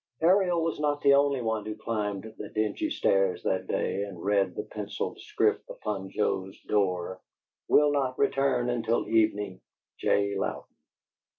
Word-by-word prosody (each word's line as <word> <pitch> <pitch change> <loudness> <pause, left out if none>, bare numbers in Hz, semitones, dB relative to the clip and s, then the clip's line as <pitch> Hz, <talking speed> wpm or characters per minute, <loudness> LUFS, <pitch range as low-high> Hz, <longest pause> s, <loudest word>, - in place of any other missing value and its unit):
Ariel 180 -1 +4
was 165 -1 -2
not 145 -1 0
the 140 - +6
only 140 -2 +3
one 110 -1 -1
who 105 0 -5
climbed 105 -3 -3 0.2
the 105 - -6
dingy 110 -1 -1
stairs 95 -2 +1
that 95 0 -1
day 100 - -1
and 100 -3 -6
read 100 +1 +1
the - - -3
pencilled - - -5
script - - 0
upon 95 -3 -4
Joe's 95 -2 -2
door: 95 -3 0 0.5
"Will 150 0 +5
not 135 -3 0
return 135 -3 +2
until 115 -1 0
evening. 105 -4 +1 0.4
J. 100 0 +1
Louden." - - -2
105 Hz, 150 wpm, -28 LUFS, 100-140 Hz, 0.5 s, the